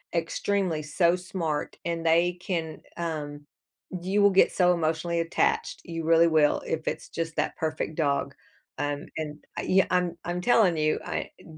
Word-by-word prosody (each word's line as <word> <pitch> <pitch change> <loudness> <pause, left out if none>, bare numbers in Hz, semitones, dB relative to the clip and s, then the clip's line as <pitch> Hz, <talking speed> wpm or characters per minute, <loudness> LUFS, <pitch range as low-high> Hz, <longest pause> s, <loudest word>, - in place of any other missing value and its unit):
extremely 170 0 0
so 170 +4 +2
smart, 170 -5 -3
and 170 -1 -3
they 170 +2 +4
can, 165 -3 -3
um 150 -3 -4 0.6
you 195 +3 +1
will 200 - +7
get 195 -1 +4
so 180 -1 +4
emotionally 170 0 -1
attached, 165 0 0
you 165 -1 -5
really 165 +1 +5
will, 155 -2 +3
if 160 0 -3
it's - - -3
just 165 -1 -4
that - - -1
perfect 155 0 -2
dog, 145 -3 0 0.4
um, 145 0 -2
and 150 -1 -4 0.2
I - - -2
yeah, 190 +1 +3
I'm 180 -2 +1
I'm 175 0 -3
telling 195 -4 +4
you, 155 0 +2
I, - - -3
eh, - - -17
165 Hz, 165 wpm, -27 LUFS, 155-180 Hz, 0.6 s, will